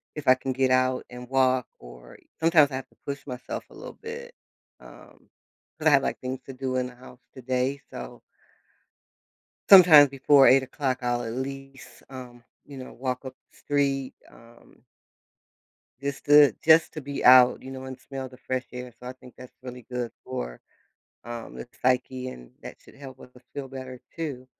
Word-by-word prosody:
if 150 Hz, -3 st, -7 dB
I 130 Hz, -, +8 dB
can 130 Hz, 0 st, -4 dB
get 130 Hz, 0 st, +1 dB
out 130 Hz, 0 st, +1 dB
and 125 Hz, 0 st, -10 dB
walk 130 Hz, -1 st, +2 dB
or -, -, -14 dB, 0.2 s
sometimes 160 Hz, -3 st, +4 dB
I -, -, -4 dB
have 130 Hz, -, -6 dB
to -, -, -29 dB
push 140 Hz, -1 st, -6 dB
myself 125 Hz, -1 st, -6 dB
a -, -, -17 dB
little -, -, -10 dB
bit, 475 Hz, +2 st, -8 dB, 0.5 s
um, -, -, -17 dB, 0.5 s
cause 155 Hz, 0 st, -1 dB
I -, -, +8 dB
have, 140 Hz, -2 st, +5 dB
like, -, -, -2 dB
things 130 Hz, 0 st, -5 dB
to 135 Hz, -, -9 dB
do 130 Hz, 0 st, -4 dB
in 125 Hz, 0 st, -1 dB
the 125 Hz, -, -13 dB
house 125 Hz, 0 st, -15 dB
today, 130 Hz, +2 st, -2 dB
so 60 Hz, -1 st, -9 dB, 1.5 s
Sometimes 165 Hz, -7 st, +9 dB
before 135 Hz, 0 st, +5 dB
8:00 130 Hz, 0 st, +2 dB
I'll 120 Hz, 0 st, 0 dB
at 115 Hz, -1 st, -5 dB
least, 135 Hz, 0 st, -8 dB
um, 125 Hz, -2 st, -11 dB, 0.2 s
you 140 Hz, -, -12 dB
know, 130 Hz, -, -9 dB
walk 130 Hz, +1 st, -4 dB
up 130 Hz, -1 st, -9 dB, 0.2 s
the -, -, -26 dB
street, 140 Hz, -2 st, -1 dB
um 115 Hz, 0 st, -20 dB, 1.2 s
just 140 Hz, -1 st, -5 dB
to 145 Hz, -4 st, +7 dB
just 160 Hz, +1 st, +5 dB
to 155 Hz, -, -6 dB
be 140 Hz, +1 st, -5 dB
out, 125 Hz, 0 st, +7 dB
you 130 Hz, -, -9 dB
know, 130 Hz, 0 st, -8 dB
and 130 Hz, -1 st, -8 dB
smell 130 Hz, +1 st, -7 dB
the 130 Hz, -, -15 dB
fresh 130 Hz, -1 st, -4 dB
air. 125 Hz, -1 st, -8 dB
So, 125 Hz, -, -10 dB
I 125 Hz, -, -6 dB
think 125 Hz, -1 st, -16 dB
that's 130 Hz, -1 st, -13 dB
really 125 Hz, -2 st, -10 dB
good 125 Hz, -2 st, -3 dB
for, -, -, -6 dB, 0.6 s
um, 120 Hz, -1 st, -8 dB
the -, -, -8 dB
psyche, 130 Hz, 0 st, 0 dB
and 60 Hz, -, -11 dB
that -, -, -9 dB
should -, -, -19 dB
help 135 Hz, -2 st, -12 dB
us 125 Hz, -, -14 dB, 0.2 s
feel 135 Hz, -2 st, -6 dB
better 130 Hz, -1 st, -9 dB, 0.2 s
too. 140 Hz, -6 st, -5 dB
130 Hz, 185 wpm, -26 LUFS, 125-140 Hz, 1.5 s, Sometimes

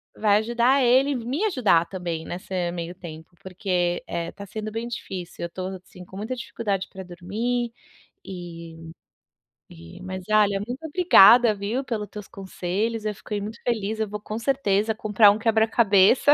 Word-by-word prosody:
vai 210 Hz, -1 st, +3 dB
ajudar 240 Hz, +5 st, +2 dB
ele 260 Hz, +3 st, +4 dB
me 250 Hz, -, -3 dB
ajudar 215 Hz, -, +3 dB
também 170 Hz, -4 st, -5 dB
nessa 185 Hz, +2 st, -7 dB, 0.2 s
meio 175 Hz, 0 st, -5 dB
tempo, 165 Hz, -1 st, -11 dB
porque, 180 Hz, -2 st, -1 dB
eh, 170 Hz, 0 st, -4 dB
tá 200 Hz, -, -10 dB
sendo 215 Hz, +2 st, -6 dB
bem 225 Hz, +2 st, -4 dB
difícil, 185 Hz, -7 st, -7 dB
eu -, -, -6 dB
tô 185 Hz, +1 st, -5 dB, 0.2 s
assim 180 Hz, -1 st, -13 dB
com 190 Hz, -, -14 dB
muita 220 Hz, +6 st, -4 dB
dificuldade 200 Hz, -5 st, -3 dB
pra 190 Hz, 0 st, -9 dB
dormir, 220 Hz, +7 st, -3 dB, 0.6 s
eh 165 Hz, -3 st, -9 dB, 0.8 s
eh, 85 Hz, -, -13 dB
mas 185 Hz, 0 st, -6 dB
olha, 205 Hz, -2 st, +4 dB
muito 255 Hz, +6 st, -6 dB
obrigada 245 Hz, -, +7 dB
viu, 210 Hz, +7 st, -3 dB
pelos 215 Hz, -5 st, -4 dB
teus 210 Hz, -2 st, -9 dB
conselhos, 200 Hz, +4 st, -3 dB
eu 210 Hz, -, -1 dB
fiquei 205 Hz, +1 st, -5 dB
muito 210 Hz, +2 st, -7 dB
feliz, 220 Hz, -2 st, -1 dB
eu 220 Hz, -, 0 dB
vou 210 Hz, 0 st, -5 dB
com 215 Hz, +2 st, -6 dB
certeza 220 Hz, -5 st, +1 dB
comprar 210 Hz, -1 st, +5 dB
um 210 Hz, -, -1 dB
quebra-cabeça, 220 Hz, +2 st, +4 dB
210 Hz, 160 wpm, -24 LUFS, 185-230 Hz, 0.8 s, obrigada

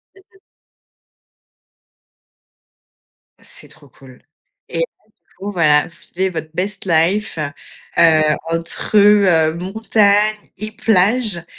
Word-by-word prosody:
Mmh 385 Hz, -, -20 dB
mh. 385 Hz, -, -23 dB, 3.0 s
C'est -, -, -12 dB
trop 150 Hz, -2 st, -14 dB
cool 130 Hz, 0 st, -18 dB, 0.5 s
et 165 Hz, -, -4 dB
là -, -, +2 dB
du -, -, -10 dB, 0.4 s
coup 200 Hz, +2 st, -5 dB
voilà, 150 Hz, -5 st, +2 dB
vous 170 Hz, -, -19 dB, 0.2 s
viviez 190 Hz, +2 st, -1 dB
votre 160 Hz, -3 st, -6 dB
best 195 Hz, +4 st, -4 dB
life, 175 Hz, +3 st, 0 dB, 0.6 s
heu, 160 Hz, -2 st, +5 dB, 0.3 s
entre, 165 Hz, +5 st, -1 dB
heu, 195 Hz, -6 st, +4 dB
montagne 210 Hz, +2 st, +1 dB, 0.2 s
et 215 Hz, +2 st, -6 dB
plage 215 Hz, -3 st, +1 dB
185 Hz, 110 wpm, -17 LUFS, 165-210 Hz, 3.0 s, heu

